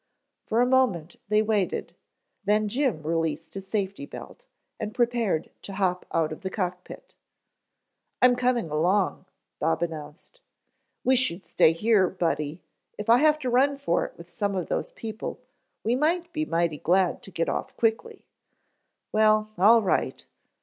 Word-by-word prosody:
For 230 +2 +2
a - - +5
moment 245 -11 +1
they 210 +1 +3
waited, 210 -4 -1 0.5
then 210 +1 +2
Jim 240 - 0
released 160 0 -2
his 195 -1 -7
safety 200 +6 -3
belt, - - -11 0.3
and 215 +1 -5
prepared 235 -9 0
to 200 - -8
hop 185 -2 -1
out 160 -2 +1
of 155 - -7
the 190 - -3
cock 180 -2 -3
pit. - - -12 1.0
"I'm 250 0 +6
coming 245 -8 0
along," 180 +4 +1 0.3
Bob 165 +2 +1
announced. 160 - -7 0.6
"Wish 260 0 +4
you'd 170 +3 -9
stay 160 - +4
here, 195 +1 +3
Buddy. 165 -3 -2 0.3
If 210 +2 0
I 240 - +7
have 305 +1 +4
to - - +1
run 275 +3 +3
for 275 -11 0
it - - -8
with 170 - -12
some 200 +3 -2
of 180 -3 -3
those - - -1
people, 220 0 -6 0.4
we 230 - +1
might 335 +5 0
be 310 0 -1
mighty 165 - 0
glad 180 +1 +2
to - - -10
get 165 -3 -2
off - - -3
quickly." 230 - -1 0.9
"Well, 215 0 +3
all 220 +5 +6
right." 190 - -1
205 Hz, 155 wpm, -26 LUFS, 170-240 Hz, 1.0 s, I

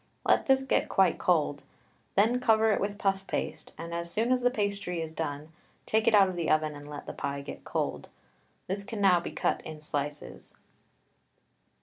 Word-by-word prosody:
Let - - +3
this 265 0 +4
get 265 - +1
quite 190 -3 +3
cold, 150 -5 +1 0.5
then 225 +5 +4
cover 225 -2 +4
it - - +1
with 205 0 -2
puff 195 -2 0
paste, - - -3
and 170 0 -6
as 170 0 -3
soon 225 +7 0
as 255 -1 +3
the 245 - +4
pastry 200 -6 -2
is 160 -1 -4
done 150 -1 -4 0.4
take 220 +1 +1
it 220 - +6
out 200 -2 +7
of 185 - -4
the 170 -2 -1
oven 155 0 +2
and 145 0 -10
let 145 - -7
the - - -6
pie 140 0 -3
get 140 - -9
cold. - - -3 0.6
This 200 +2 -2
can 215 +1 -6
now 190 -3 +5
be 170 - -5
cut - - -1
in 155 -1 -8
slices. 145 -1 -5
185 Hz, 195 wpm, -29 LUFS, 155-215 Hz, 0.6 s, out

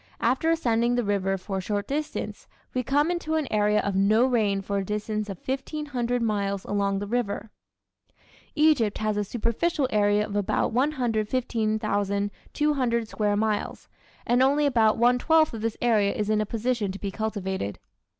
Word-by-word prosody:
After 260 +7 +1
ascending 240 -7 +2
the 245 - +1
river 195 -2 0
for 190 +1 -4
a - - -4
short 205 +2 -2
distance 300 +2 -4 0.3
we 255 - 0
come 290 +6 +1
into 330 -3 -2
an 310 -3 0
area 210 0 +3
of 200 -1 -2
no 215 +5 +4
rain 210 -6 +1
for 200 0 -1
a - - -2
distance 210 +1 -3
of 195 - -5
1500 265 -3 -2
miles 200 -3 -1
along 200 -1 0
the 205 - -3
river. 220 -1 -2 1.0
Egypt 295 -9 +3
has 215 -1 -1
a 210 - 0
superficial 240 - -1
area 205 0 +3
of 205 - -7
about 205 +2 0
115,200 230 0 0
square 210 -2 0
miles, 215 -1 -2 0.4
and 245 +1 +3
only 285 +3 +3
about 230 -6 +3
one 245 +2 +4
twelfth 320 +1 +3
of 225 - -5
this 225 0 -2
area 215 -4 +3
is 215 -3 -2
in 215 0 +2
a 215 - -2
position 230 -2 -1
to 195 - -7
be 200 -1 -4
cultivated. 190 - -3
220 Hz, 165 wpm, -26 LUFS, 205-250 Hz, 1.0 s, no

